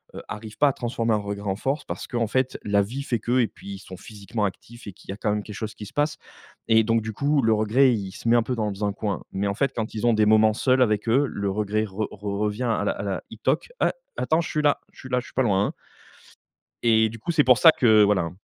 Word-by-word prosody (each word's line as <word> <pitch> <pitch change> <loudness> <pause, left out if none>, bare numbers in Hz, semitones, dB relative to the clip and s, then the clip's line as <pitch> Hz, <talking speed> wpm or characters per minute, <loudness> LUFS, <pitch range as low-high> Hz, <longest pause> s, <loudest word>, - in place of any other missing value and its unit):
heu, - - -6
arrivent 105 +1 -8
pas 145 - +4
à - - -2
transformer 115 -2 -1
un - - +3
regret 100 0 -4
en 95 - 0
force, 135 +8 -2
parce - - -5
qu'en 120 -3 -1
fait 130 +3 -1
la 100 0 +2
vie 125 +8 -5
fait 125 -4 -1
que, 120 +4 +1
et 120 - +3
puis 100 -1 -10
ils - - -10
sont 95 -1 -11
physiquement 105 +2 -4
actifs 120 +4 -7
et 100 - -7
qu'il - - -20
y - - -2
a - - -9
quand 105 - -1
même 105 0 -1
quelque 105 - -9
chose 110 +1 -5
qui 105 - -8
se - - -15
passe 145 +1 0 0.5
et 110 0 +5
donc 115 +1 +1
du 110 0 -5
coup 140 +5 +1
le 110 -2 +3
regret 110 +5 +3
il 100 -4 -3
se 105 - -8
met 120 - +5
un 120 - +3
peu 125 +2 -2
dans 105 -2 -2
un 100 - -1
coin. 100 -2 -3
Mais 100 +1 -1
en 100 - -2
fait 140 +5 0
quand 110 -2 -3
ils 110 - -2
ont 120 - +4
des 110 -1 +3
moments 110 0 +5
seuls 130 +4 +2
avec 110 -2 +1
eux, 135 +5 +4
le 100 -4 -3
regret 105 +1 -1
re 105 +1 -4
re 100 0 -5
revient 105 +3 -1
à 115 -4 0
la - - +2
à - - -6
la 95 -2 -3
il 110 - -10
toc: 130 - 0
«A - - +2 0.2
attends 160 +2 +1
je 165 - -5
suis 155 - 0
là 145 -1 +2
je - - -19
suis 130 - -10
là, 125 0 +1
je 125 - -8
suis - - -14
pas 130 - +2
loin, 100 -3 +2
hein» - - -5 1.1
et 110 -1 +4
du 115 +1 -9
coup 140 +10 -3
c'est 150 -3 +4
pour 125 -1 +5
ça 160 +2 +8
que, 110 -6 +5
voilà, 100 -2 +2
hein 85 +2 -6
110 Hz, 295 wpm, -24 LUFS, 105-125 Hz, 1.1 s, ça